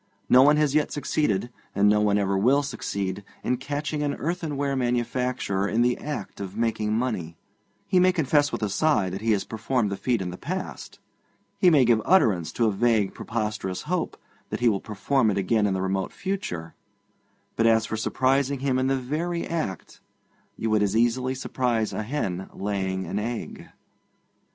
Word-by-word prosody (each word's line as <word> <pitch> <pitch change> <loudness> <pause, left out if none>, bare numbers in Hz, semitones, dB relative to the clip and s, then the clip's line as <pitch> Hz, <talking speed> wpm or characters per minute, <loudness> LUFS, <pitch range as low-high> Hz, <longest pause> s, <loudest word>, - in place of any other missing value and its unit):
No 125 - +7
one 150 +2 +6
has 150 -2 +2
yet 150 -1 +2
succeeded, 120 -7 -1 0.2
and 100 +1 +4
no 105 0 +4
one 105 -1 +3
ever 100 -1 +1
will 130 +9 +3
succeed, 100 -7 -3 0.2
in 125 - 0
catching 145 +3 -3
an 145 -1 0
earthenware 145 -4 -2
manufacturer 120 -5 -1
in 115 +3 +2
the 125 0 +2
act 145 -9 -6
of 100 +1 -6
making 110 -2 0
money; 90 -10 -2 0.5
he 185 - +3
may 185 +1 +5
confess 145 -3 +2
with - - -3
a 105 - 0
sigh 105 -5 +2
that 95 +2 -5
he 115 0 +1
has 100 - 0
performed 115 -1 -1
the - - -1
feat 120 +3 0
in 90 -2 -3
the 90 - -9
past, - - -5 0.6
he 180 - +6
may 145 -6 +5
give 115 -2 +4
utterance 105 - +3
to 115 - +1
a 110 - +3
vague, 110 -1 +2
preposterous 105 -4 -3
hope 175 +2 -2 0.3
that - - -3
he 120 - +3
will 100 -3 0
perform 110 +3 +1
it 100 - 0
again 105 +2 +2
in 95 - 0
the 95 - -1
remote 95 0 -1
future, 90 - -4 0.8
but 115 - +3
as 110 -1 +4
for 110 - -3
surprising 135 +4 +1
him 135 -2 +1
in 130 - +1
the 135 0 +2
very 160 +7 -2
act, 155 - -4 0.6
you 110 - -2
would 110 -1 +3
as 105 +1 +1
easily 125 +3 +1
surprise 120 -4 -1
a - - -2
hen 105 -7 -3
laying 95 -2 -2
an - - -2
egg. 115 +2 -5
115 Hz, 185 wpm, -25 LUFS, 100-140 Hz, 0.8 s, No